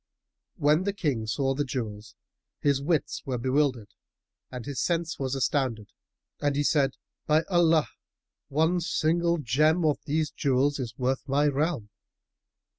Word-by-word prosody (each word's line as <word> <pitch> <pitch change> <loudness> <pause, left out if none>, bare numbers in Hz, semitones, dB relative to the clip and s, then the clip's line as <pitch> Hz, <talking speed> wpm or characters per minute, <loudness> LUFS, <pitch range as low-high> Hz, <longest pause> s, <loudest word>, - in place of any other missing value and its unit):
When 150 +5 +2
the 200 - 0
King 140 - -1
saw 135 +4 0
the 145 +2 -1
jewels, 110 -4 -5 0.4
his 140 -2 +1
wits 155 +1 -1
were 130 -2 -2
bewildered 130 -3 0 0.6
and 125 -2 -7
his 140 -2 -3
sense 170 -1 -1
was 135 -1 -1
astounded 120 -4 -1 0.5
and 145 -1 +1
he 145 - +1
said, 140 -3 +2 0.3
"By 155 +1 +4
Allah, 165 -3 +4 0.6
one 160 +5 +2
single 170 0 +1
gem 155 +5 +2
of 150 -2 +2
these 155 0 0
jewels 140 +1 +1
is 120 -3 -5
worth 130 +2 -1
my 145 +2 +3
realm!" 145 -6 -1
145 Hz, 140 wpm, -27 LUFS, 130-155 Hz, 0.6 s, By